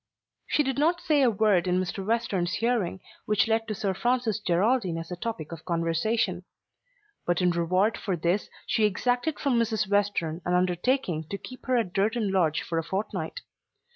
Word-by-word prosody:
She 300 - +2
did 270 0 -1
not 335 +4 +3
say 300 -4 +2
a 255 - +5
word 200 -4 +2
in 180 0 +2
Mr. 185 +1 -3
Western's 200 -5 0
hearing 225 -6 0 0.3
which 210 -1 +3
led 225 0 +1
to 215 - -3
Sir 195 -1 -1
Francis 240 0 0
Geraldine 190 0 +1
as 165 +1 -7
a - - -2
topic 175 -5 -5
of 165 -2 -8
conversation. 180 +3 0 0.8
But 175 - 0
in 180 -1 +3
reward 185 +5 +1
for 190 - -1
this 175 +5 0 0.2
she 220 - +2
exacted 245 +8 0
from 260 -5 +1
Mrs. 220 -3 0
Western 200 -5 0
an 180 - +1
undertaking 180 - +1
to 200 - -3
keep 255 +6 -11
her 255 -1 +3
at 215 -7 -1
Durton 215 +1 +1
Lodge 165 -5 +2
for 165 -1 -2
a - - -2
fortnight. 205 - -3
200 Hz, 180 wpm, -27 LUFS, 175-230 Hz, 0.8 s, a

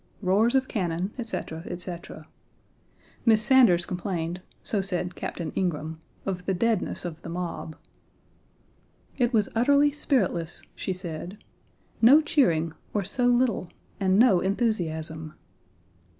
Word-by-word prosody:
Roars 210 +7 +3
of 265 0 +2
cannon, 180 -1 -2
etc., 190 -8 -3
etc. 175 -3 -6 1.0
Miss 220 -2 +4
Sanders 235 -11 +5
complained 180 -1 -3 0.2
(so 205 - -1
said 180 -2 -3
Captain 170 -3 -5
Ingraham) 160 -3 -2 0.2
of 180 -2 -4
the 190 - +1
deadness 225 -2 0
of 165 -1 -6
the 165 - -8
mob. 170 -2 -5 1.4
"It 240 -1 +3
was 215 -4 +2
utterly 285 +5 +4
spiritless," 195 - -1
she - - -4
said; 180 +1 -6 0.6
"no 255 +7 +8
cheering, 170 - +2 0.2
or 205 - +1
so 245 +6 0
little, 240 -7 +2 0.3
and 190 -1 +3
no 215 -5 +6
enthusiasm." 160 -7 -1
185 Hz, 120 wpm, -26 LUFS, 170-230 Hz, 1.4 s, no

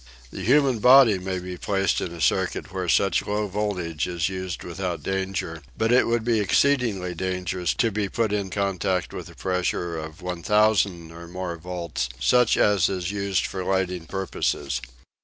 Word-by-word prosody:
The - - -7
human 135 -1 +3
body 125 -4 +7
may 95 0 -3
be 90 0 -6
placed 95 -2 0
in 90 - -3
a 85 - -9
circuit - - 0
where 95 -2 -2
such 100 +3 +3
low 105 +1 -1
voltage 90 -6 -2
is 85 -1 -1
used 95 -1 -5
without 90 0 -4
danger, 95 -4 -3 0.2
but 110 +1 +1
it 125 - +5
would 115 -1 +1
be 115 -1 +2
exceedingly 105 -4 +1
dangerous 90 0 -2
to 115 -2 +1
be 100 -1 -2
put 110 -1 0
in 100 -2 -1
contact 95 -2 -1
with - - -7
a - - -14
pressure 90 -2 -1
of 80 +2 -9
1000 90 -1 +1
or 85 +1 -10
more 90 0 -4
volts, 85 -6 -4
such 125 -2 +4
as 100 -3 +3
is 95 -1 -2
used 100 -2 0
for 95 -1 -4
lighting 90 -3 -1
purposes. 75 -8 -2
95 Hz, 170 wpm, -24 LUFS, 90-105 Hz, 0.2 s, body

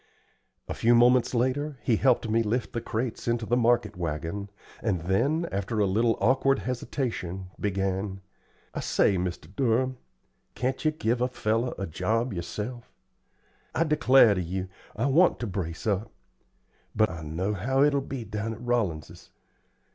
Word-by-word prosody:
A - - -3
few 120 +1 +3
moments 125 +1 +4
later, 130 +4 0
he 115 -4 +2
helped 125 -2 +3
me 115 +1 +2
lift 115 +3 -1
the 115 - -2
crates 115 +1 -3
into 120 -1 0
the 120 - +1
market 120 0 +2
wagon; 85 +4 -4 0.3
and 100 -7 0
then, 135 - +1
after 100 +3 -2
a 105 - +4
little 115 +4 +2
awkward 135 +5 +3
hesitation, 110 -8 -4
began: 95 0 -1 0.5
"I - - -3
say, 100 - +2
Mr. 90 +2 -4
Durham, 130 0 +1 0.6
can't 130 +1 -2
ye 155 - +4
give 125 -6 -1
a 125 - +3
feller 120 0 -1
a 95 - -3
job 115 +8 -1
yerself? 105 +8 -5 0.8
I 165 - +3
declar' 135 -7 +5
to 95 - -1
you, 90 +2 -4 0.3
I 115 - -1
want 160 +7 +4
to - - -1
brace 90 -5 -4
up; 105 +1 -1 0.8
but 110 -2 +3
I 85 -2 -7
know 85 +7 -2
how 130 +8 +1
it'll 145 -1 +3
be 135 -2 -5
down 110 +1 -4
at 115 - -13
Rollins's. 115 -11 -2
115 Hz, 155 wpm, -27 LUFS, 95-125 Hz, 0.8 s, declar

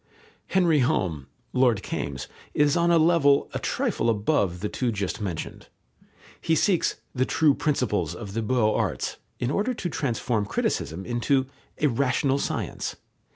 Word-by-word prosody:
Henry 175 -5 +3
Home 80 - 0 0.3
(Lord 125 -5 +3
Kaimes) 70 -3 -4 0.3
is 145 -1 +3
on 170 0 +3
a 170 - +5
level 155 -4 +4
a - - -2
trifle 115 - 0
above 105 - +1
the 105 - -1
two 125 +2 -1
just 100 0 -3
mentioned. 90 -6 -5 0.7
He 165 - +2
seeks 180 +2 +2 0.2
"the 130 - +1
true 150 +2 +3
principles 130 -8 0
of 100 -4 -7
the 115 - -1
beaux 110 -1 +2
arts," - - -1 0.2
in 120 +2 -1
order 215 +9 0
to 180 - -3
transform 115 -7 -1
criticism 90 -2 -2
into 130 +3 +1 0.3
"a - - +2
rational 135 +1 +1
science." - - -3
125 Hz, 150 wpm, -26 LUFS, 105-150 Hz, 0.7 s, a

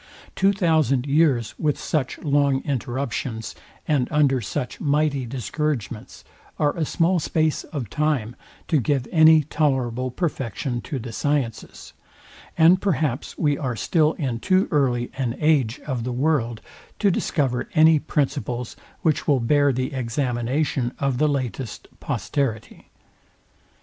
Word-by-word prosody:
Two 195 +1 +3
thousand 160 - +2
years 140 -6 +2
with 150 -2 0
such 140 -5 -2
long 140 -2 +1
interruptions, 125 -4 -3 0.3
and 140 -5 +2
under 140 -4 +3
such 115 +4 -4
mighty 145 -3 +1
discouragements 125 -2 -4 0.3
are 145 -1 +1
a 165 - -1
small 175 +3 +1
space 155 0 0
of 135 -7 -5
time 135 -3 -1 0.3
to 155 - +2
give 135 -1 0
any 160 -1 +6
tolerable 130 -5 0
perfection 125 - -3
to 145 - -5
the 120 -1 -6
sciences; 135 -1 -3 0.6
and 170 +3 +6
perhaps 150 -8 -1
we 145 -3 +1
are 130 -5 -2
still 155 - +2
in 130 -6 -3
too 185 - +2
early 125 -5 +1
an 125 -3 -1
age 145 -6 +2
of 130 -5 -3
the 125 - -3
world 125 -4 0 0.4
to 200 -2 +3
discover 135 -7 -1
any 160 0 +6
principles, 135 -5 -2 0.3
which 155 -3 +1
will 140 -3 +4
bear 145 +4 +3
the 130 +3 -2
examination 125 +1 -1
of 135 -3 -1
the 155 - +3
latest 130 -3 -4
posterity. 130 -7 -3
140 Hz, 130 wpm, -23 LUFS, 125-155 Hz, 0.6 s, any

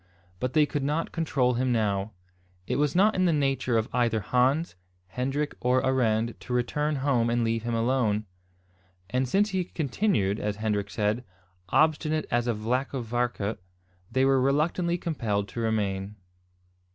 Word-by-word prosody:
But 125 +3 -2
they 155 -1 +5
could 145 0 -3
not 150 +4 -1
control 140 -7 +1
him 125 +1 0
now. 105 -2 0 0.5
It - - -1
was 145 +1 +1
not 205 +4 +5
in 185 - +1
the 175 - +4
nature 135 -5 +1
of 110 - 0
either 120 -2 +2
Hans, 130 - +1 0.4
Hendrik, 135 +7 -2
or 125 +1 +2
Arend 115 -3 +1
to 125 - -6
return 150 +5 0
home 120 -5 +2
and 120 0 +1
leave 115 0 0
him 115 +1 -2
alone; 115 -3 +1 0.9
and 130 +1 0
since 205 +8 +2
he 190 -1 0
continued, 140 - 0
as 105 0 -2
Hendrik 105 -1 -1
said, 105 +3 -1 0.5
"obstinate 155 - +2
as 120 0 +1
a 120 - +1
vlacke 125 +5 -1
varke" 120 -2 -2 0.5
they 130 +3 +2
were 135 -1 +4
reluctantly 165 +6 +1
compelled 110 - -2
to - - -6
remain. 105 -3 -1
125 Hz, 155 wpm, -27 LUFS, 110-145 Hz, 0.9 s, they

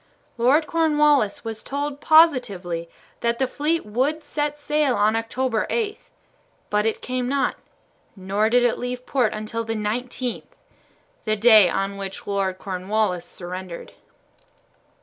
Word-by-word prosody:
Lord 265 +7 +3
Cornwallis 300 -9 +2
was 225 -1 -5
told 285 +1 -4
positively 210 - +3 0.3
that 235 0 0
the 265 - +1
fleet 300 +5 -1
would 265 +9 -1
set 295 0 -3
sail 295 -3 +1
on 215 +2 +2
October 225 0 -1
8, 430 -3 -1 0.7
but 210 +1 +2
it 225 - -2
came 250 -1 -2
not, 280 0 0 0.6
nor 200 +3 0
did 245 +1 +4
it 240 - +1
leave 245 0 -4
port 245 -6 +1
until 215 +2 -4
the 225 0 -3
19th, 240 +3 -3 0.8
the 215 -1 +1
day 215 -3 +7
on 195 +2 -2
which 195 -1 -7
Lord 195 -2 -1
Cornwallis 185 -1 -2
surrendered. 180 -1 -8
230 Hz, 130 wpm, -23 LUFS, 205-280 Hz, 0.8 s, day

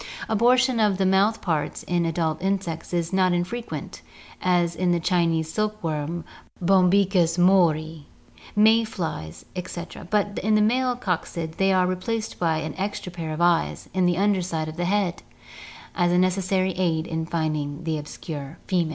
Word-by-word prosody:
Abortion 245 +3 +3
of 210 -3 +3
the 190 - +1
mouth 195 +4 +3
parts 160 -5 -2
in 175 -1 0
adult 165 -1 -1
insects 190 -4 -2
is 170 0 -1
not 185 -1 +3
infre 180 +8 -2
quent, - - -7 0.4
as 175 -2 +2
in 180 -1 +1
the 175 - +2
Chinese 165 -2 +1
silk 215 0 -1
worm 160 +1 -2 0.4
(Bombyx 185 -1 +3
mart), 175 -3 +5 0.8
may 220 +2 +5
flies, 160 - -5
etc., 175 -1 -7
but 205 0 0
in 215 +2 +2
the - - +4
male 250 +3 +2
coccid 170 -7 -3
they 195 0 +3
are 185 -1 +3
replaced 215 +5 -3
by 165 -2 +1
an 155 -1 -4
extra 195 -2 -3
pair 165 -2 -5
of 155 +2 -4
eyes 175 -1 +1
on 185 -1 +2
the 175 -1 +1
under 200 -1 +2
side 165 -3 -3
of 155 - -6
the 175 +1 -2
head 195 -1 0 0.7
as 175 -1 +1
a 175 - +3
necessary 185 +1 +1
aid 170 -3 0
infinding 160 -2 -2
the 160 -2 -1
obscure 150 0 -7
female! 175 -4 +1
180 Hz, 165 wpm, -24 LUFS, 165-195 Hz, 0.8 s, mart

